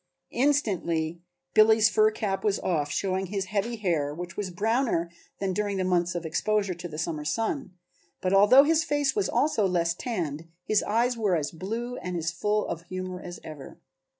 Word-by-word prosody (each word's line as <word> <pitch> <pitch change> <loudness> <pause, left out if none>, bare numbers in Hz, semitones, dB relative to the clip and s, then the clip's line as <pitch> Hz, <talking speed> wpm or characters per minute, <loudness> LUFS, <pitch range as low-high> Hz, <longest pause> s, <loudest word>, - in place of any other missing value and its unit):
Instantly 175 - 0 0.3
Billy's 220 0 +6
fur 215 0 +4
cap 195 -3 -3
was 205 -2 +2
off, 150 -5 0
showing 190 +3 -1
his 195 0 -2
heavy 220 +4 0
hair, 165 -9 -1
which 175 +1 -7
was 205 -2 -3
browner 210 -2 0 0.3
than 195 -1 -1
during 205 0 -1
the 190 - 0
months 180 -1 +1
of 170 -1 -3
exposure 200 +4 0
to 175 0 -7
the 155 -2 -8
summer 155 -2 -3
sun, 225 - -2 0.4
but 185 +1 0
although 205 +8 +8
his 320 +1 +3
face 290 -1 0
was 410 -2 +1
also 225 -9 +2
less 170 -2 +1
tanned, 165 - -4 0.2
his 215 +2 +2
eyes 235 +3 +1
were 205 -5 +2
as 150 -3 -1
blue 225 +8 -4
and 180 -1 -4
as 165 0 -1
full 210 +5 0
of 165 - -4
humor 185 0 -5
as 175 0 -8
ever. 150 -3 -10
190 Hz, 180 wpm, -27 LUFS, 170-220 Hz, 0.4 s, although